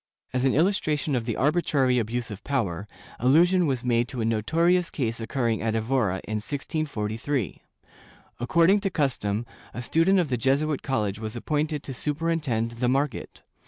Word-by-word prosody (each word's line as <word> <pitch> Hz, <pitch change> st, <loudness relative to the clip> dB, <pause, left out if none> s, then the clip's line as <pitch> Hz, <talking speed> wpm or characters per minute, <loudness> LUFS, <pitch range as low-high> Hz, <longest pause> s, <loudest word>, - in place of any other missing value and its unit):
^ -, -, -69 dB, 0.3 s
As 130 Hz, +1 st, +1 dB
an 135 Hz, -, +3 dB
illustration 155 Hz, -4 st, +1 dB
of 120 Hz, -3 st, -1 dB
the 115 Hz, -3 st, -2 dB
arbitrary 140 Hz, -4 st, +2 dB
abuse 115 Hz, +1 st, -3 dB
of 100 Hz, -, -8 dB
power, 105 Hz, -, -2 dB, 0.3 s
allusion 170 Hz, +8 st, +4 dB
was 130 Hz, -3 st, -1 dB
made 120 Hz, -1 st, +2 dB
to 125 Hz, -, -6 dB
a 110 Hz, -, 0 dB
notorious 165 Hz, +11 st, +2 dB
case 115 Hz, -7 st, -2 dB
occurring 115 Hz, -1 st, -1 dB
at 110 Hz, 0 st, 0 dB
Evora, 110 Hz, -5 st, 0 dB
in 110 Hz, 0 st, -3 dB
1643. 130 Hz, -, -3 dB, 0.8 s
Accord 165 Hz, +9 st, +4 dB
ing 205 Hz, -, +4 dB
to 195 Hz, -1 st, -1 dB
custom, 120 Hz, -, -1 dB, 0.3 s
a -, -, -4 dB
student 165 Hz, +10 st, +3 dB
of 175 Hz, -5 st, +1 dB
the 125 Hz, -, 0 dB
Jesuit 140 Hz, +4 st, +1 dB
college 105 Hz, -6 st, -1 dB
was 110 Hz, +1 st, -5 dB
appointed 150 Hz, +3 st, -1 dB
to 135 Hz, -, -6 dB
superintend 150 Hz, -5 st, -1 dB
the 120 Hz, +1 st, -1 dB
market. 135 Hz, 0 st, -2 dB
130 Hz, 165 wpm, -26 LUFS, 115-155 Hz, 0.8 s, allusion